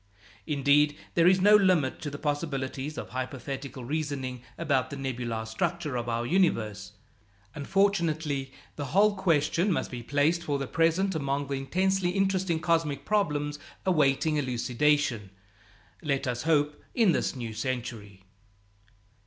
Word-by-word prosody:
Indeed, 145 0 +3 0.2
there 170 0 +4
is 185 +1 +5
no 205 +3 +7
limit 185 -10 +3
to 150 - -3
the 145 - -7
possibilities 145 -1 -3
of - - -6
hypothetical 130 0 -5
reasoning 140 -3 -3 0.2
about 140 -6 0
the - - -6
nebular 120 -4 -3
structure 145 +6 -2
of 120 -1 -2
our 115 0 -1
universe; 110 - 0 0.6
unfortunately, 155 -5 0 0.3
the 145 - -3
whole 210 0 +5
question 170 +1 +2
must 170 - -1
be 120 -1 -5
placed 145 +7 +1
for 145 -4 -1
the 135 - -3
present 165 +7 +1
among 140 -2 -1
those 140 0 -3
intensely 185 +6 +1
interesting 190 -3 +1
cosmic 165 -4 0
problems 150 -8 0 0.3
awaiting 155 -3 +2
elucidation, 130 -3 +1 0.7
let 140 -3 -1
us 120 -1 -2
hope, 150 -2 +1
in 225 -7 +5
this - - 0
new 115 -3 -5
century. 110 -4 -5
145 Hz, 135 wpm, -28 LUFS, 130-170 Hz, 0.7 s, no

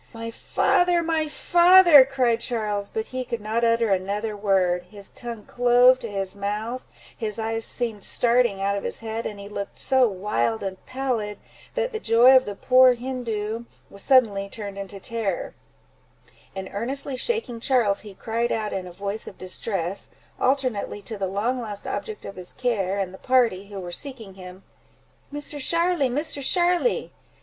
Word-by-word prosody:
"My 230 0 -6
father, 350 +8 +2
my 320 -1 0
father!" 345 -1 +7
cried 255 -4 +1
Charles; 210 -4 -2
but 220 - -3
he 255 0 -2
could 235 -2 -4
not 220 +3 -2
utter 230 -2 +2
another 200 +3 -1
word; 185 -3 +1
his 200 -1 -8
tongue 235 -3 -7
clove 245 +1 +5
to 230 - -6
his 195 -2 -3
mouth, 210 +5 -4 0.3
his 215 -2 -4
eyes 225 0 -2
seemed 225 -5 0
starting 235 -5 +2
out 200 0 +1
of 200 - -4
his - - -4
head, 225 0 -4
and 205 -2 -8
he 200 - -8
looked 200 -1 -6
so 260 -2 +3
wild 180 - -1
and 190 -1 -5
pallid, 250 -6 -2 0.4
that - - -1
the 440 - -2
joy 235 - +6
of 260 - +5
the 205 - -5
poor 255 +3 +5
Hindoo 235 -3 -4 0.3
was 200 - -10
suddenly 205 -7 +3
turned 200 -2 -7
into 195 0 -7
terror; 215 -3 -3 1.0
and 190 -1 -5
earnestly 265 +6 -2
shaking 450 - -2
Charles, 230 -5 +2
he 205 -2 -11
cried 230 +4 -2
out, 215 -2 -2
in 185 -1 -4
a - - -9
voice 200 +4 -4
of - - -10
distress, 185 0 -4 0.3
alternately 255 -6 0
to 220 - -5
the 195 -2 -2
long 225 +7 -1
lost 210 -3 -6
object 435 -1 -5
of 195 - -8
his 180 -1 -7
care, 205 -7 -1
and 190 -2 -2
the 190 - -11
party 235 -7 +2
who 200 -1 -7
were 175 -2 -7
seeking 230 -3 -8
him—"Misser 195 +10 -11
Sharly—Misser 300 -3 0
Sharly! 355 - +1
225 Hz, 165 wpm, -24 LUFS, 200-255 Hz, 1.0 s, father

